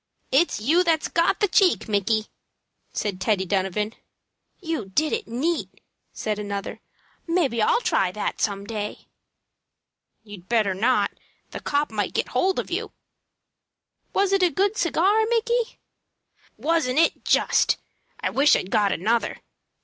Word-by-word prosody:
"It's 295 +1 +3
you 315 +12 +3
that's 325 -3 +1
got 335 +5 +1
the 415 - +4
cheek, 370 -5 +3
Micky," 215 +1 +1 0.7
said 195 -3 -3
Teddy 205 -4 +1
Donovan. 195 +3 -1 0.7
"You 325 - -3
did 305 - +1
it 450 -1 -2
neat," 315 +8 -1 0.4
said 210 -1 -3
another. 200 -1 -5 0.5
"Maybe 315 -10 +1
I'll 215 +3 +3
try 185 -6 +1
that 210 - -3
same, - - +5
some 200 -1 -5
day." 210 -1 -5 1.2
"You'd 205 -4 -12
better 220 -5 +2
not. 235 +7 +2 0.4
The - - -6
copp 290 -2 -1
might 210 -3 -2
get - - 0
hold 370 +9 +1
of - - -3
you." - - -3 1.2
"Was 395 -1 +1
it 390 - +3
a 360 - +5
good 395 +7 0
cigar, 390 +4 +2
Micky?" 470 0 0 0.8
"Wasn't 310 -5 0
it, 330 - +2
just! - - +3 0.4
I - - -1
wish 285 +2 +5
I'd 185 - -3
got 205 -2 +3
another. 225 +7 0
250 Hz, 140 wpm, -24 LUFS, 205-340 Hz, 1.2 s, same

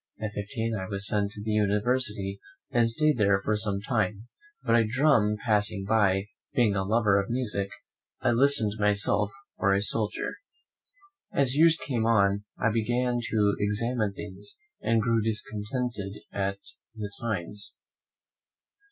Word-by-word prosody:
At 105 -1 -3
fifteen 110 +3 -3
I 95 -2 -4
was 100 0 -2
sent 100 -1 +1
to 105 - -8
the 110 - -2
university, 105 -1 0 0.3
and 120 -1 +3
stayed 150 +2 +1
there 100 -2 +4
for 105 - +2
some 105 -2 -1
time; 110 -1 -1 0.3
but 115 -2 +3
a 115 - +5
drum 115 -3 +3
passing 105 -3 +1
by, 100 -2 +2 0.3
being 115 -6 +3
a 95 - 0
lover 105 -1 +3
of 100 - -8
music, 110 -5 -1 0.5
I - - +2
listed 115 -4 +3
myself 105 0 +2 0.3
for 100 -1 +3
a 100 - +1
soldier. 105 0 -1 0.9
As 135 -1 +2
years 165 +1 +6
came 125 -5 -1
on, 100 -2 +3
I 110 - +1
began 120 +2 0
to 105 -2 +2
examine 105 +1 0
things, 100 0 -7 0.2
and 115 -1 +2
grew 115 -1 +2
discontented 105 0 -2 0.2
at 100 0 -1 0.4
the 105 -2 -5
times. 105 -3 -4
105 Hz, 145 wpm, -27 LUFS, 100-115 Hz, 0.9 s, years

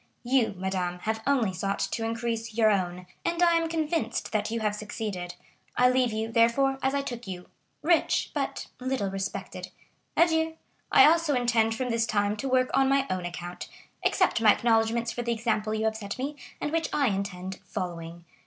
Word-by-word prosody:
You, 245 -4 +2
madame, 185 -1 -2
have 220 +1 -1
only 245 -9 +2
sought 195 +2 -2
to 230 - -2
increase 225 -1 -3
your 220 -2 +5
own, 180 -2 -1 0.2
and 345 +1 +1
I 340 -1 +5
am 330 -1 +1
convinced 315 -7 -1
that 215 -1 0
you 230 +1 -2
have 210 -1 +1
succeeded. 210 -4 -5 0.4
I 250 0 +5
leave 255 -2 +2
you, 220 +1 -2
therefore, 270 +4 +3
as 265 +1 +1
I 280 - 0
took 240 -4 -6
you,—rich, 195 - -1
but - - -2
little 255 -6 -1
respected. 195 0 -5 0.5
Adieu! 320 -1 +3 0.3
I - - +8
also 320 -2 +4
intend 235 -2 +2
from 250 0 -2
this 230 0 +1
time 205 0 +1
to 270 +5 -3
work 255 0 +2
on 270 0 +4
my 275 0 +3
own 185 -1 -2
account. 175 0 -7 0.3
Accept 370 - +2
my 215 -2 +7
acknowledgments 230 0 +2
for 240 - -4
the 235 0 0
example 215 -2 -1
you 220 0 -1
have 220 0 0
set 200 -2 -6
me, 280 +3 -3 0.2
and 295 - -2
which 330 0 0
I 280 -4 +2
intend 190 -1 -4
following. 170 -1 -6
225 Hz, 180 wpm, -27 LUFS, 200-265 Hz, 0.5 s, I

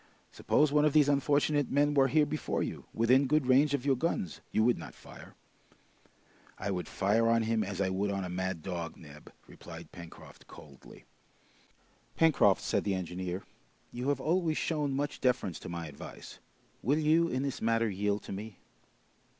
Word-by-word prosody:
Suppose 150 -1 +2
one 150 0 +3
of 150 -2 +3
these 150 -2 +5
unfortunate 145 0 +2
men 145 +1 +2
were 135 -2 +4
here 150 +3 +3
before 155 +1 -2
you, - - -6
within 130 +4 +3
good 150 0 +2
range 140 +3 +4
of 140 -1 -5
your 140 -2 +3
guns, 125 - -2
you 110 - +2
would 120 -3 +2
not 80 - -10
fire." - - -14 1.2
"I 100 +1 -3
would 90 -2 -3
fire 110 +4 +1
on 115 0 +3
him 110 -1 0
as 100 -1 -5
I 95 -1 +1
would 100 +2 -1
on 100 -1 -2
a - - -4
mad 90 -2 -3
dog, 85 -3 -5
Neb," 75 -2 -14
replied - - -12
Pencroft 85 -1 -13
coldly. 70 -3 -15 1.1
"Pencroft," 160 -3 +4
said - - 0
the 100 -2 0
engineer, 90 +1 -4 0.5
"you 125 +3 -3
have 145 -2 0
always 165 +1 0
shown 150 -4 -1
much 145 +1 -3
deference 125 - 0
to - - -9
my 85 -1 -5
advice; 75 -2 -10 0.4
will 140 +7 +1
you, 160 +2 +3
in 130 -3 -2
this 140 -2 -4
matter, 115 0 +2
yield 100 0 -1
to - - -9
me?" 100 +1 -7
115 Hz, 175 wpm, -30 LUFS, 95-145 Hz, 1.2 s, these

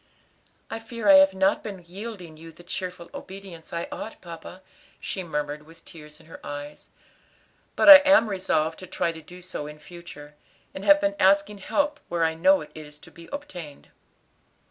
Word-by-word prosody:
"I 225 - -4
feat 225 0 -9
I 200 -2 +8
have 190 0 +5
not 190 +1 +2
been 195 -5 -8
yielding 185 -3 -8
you 165 +1 -12
the 170 +2 -16
cheerful 180 0 -6
obedience 190 -4 -10
I 170 0 -3
ought, 225 - -7
papa," 170 +2 -11 0.4
she 190 - -5
murmured 150 -3 -4
with 165 +1 -18
tears 150 -3 -13
in 165 - -19
her 165 - -13
eyes, 145 +1 -8 0.9
"but - - +2
I 295 -1 +14
am 285 -4 +4
resolved 165 -5 -1
to 185 - -10
try 170 -1 -1
to 165 -1 -11
do 180 +3 -13
so 175 -5 -6
in 150 0 -10
future; 150 -3 -12 0.4
and 190 - -7
have 295 +6 +6
been 300 0 0
asking 200 +2 +3
help 295 +8 -1
where 170 -1 0
I 160 0 +2
know 285 - +4
it - - -11
is 150 -1 -11
to - - -16
be 170 0 -14
obtained." 180 - -8
180 Hz, 185 wpm, -25 LUFS, 160-200 Hz, 0.9 s, I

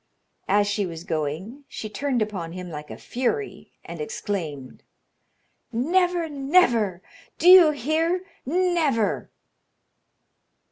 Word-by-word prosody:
As 205 +1 +3
she 205 -1 -1
was 165 -1 -8
going, 165 - -4
she 215 - -6
turned 250 +1 -1
upon 185 -6 -6
him 180 -1 -7
like 150 -1 -8
a - - -8
fury, 400 - -3 0.2
and - - -7
exclaimed: 185 - -5 0.9
"Never, 345 +7 +1
never! 270 - +2 0.3
Do 345 - +1
you 360 -3 +10
hear? 315 +6 0 0.2
Never!" 320 - 0
240 Hz, 105 wpm, -24 LUFS, -, 0.9 s, you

